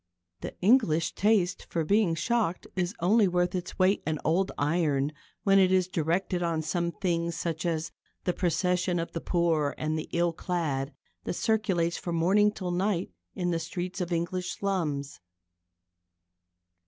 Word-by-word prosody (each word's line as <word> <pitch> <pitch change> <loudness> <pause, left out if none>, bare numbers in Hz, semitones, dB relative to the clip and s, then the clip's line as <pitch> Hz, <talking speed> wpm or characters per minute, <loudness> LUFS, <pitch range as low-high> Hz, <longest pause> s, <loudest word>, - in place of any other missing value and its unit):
The - - -7
English 185 -7 +3
taste 200 -4 +1
for 165 -2 -1
being 200 -2 +3
shocked 185 +2 0
is 185 +2 -1
only 205 +4 +4
worth 180 0 +1
its 180 -1 -4
weight 190 +2 +3
in 155 -1 0
old 185 +5 +2
iron 145 -2 +1 0.3
when 195 -1 +5
it 185 -1 +4
is 185 -1 +3
directed 175 +1 -1
on 165 -2 0
some 170 +3 -1
thing 170 -1 -1
such 170 0 -3
as 160 -1 -2 0.3
the 180 - 0
procession 180 0 0
of 165 0 -3
the 165 - -4
poor 165 -5 +1
and 155 +1 -1
the - - -7
ill 170 0 +1
clad 155 -6 -2 0.3
that - - -2
circulates 185 -5 +1
from 170 -1 -3
morning 200 +5 +4
till 185 -4 -4
night 180 - 0 0.2
in 175 -1 -1
the 165 - 0
streets 180 +3 -4
of 175 0 -3
English 175 +2 -2
slums. 155 -8 -2
175 Hz, 155 wpm, -28 LUFS, 165-185 Hz, 0.3 s, when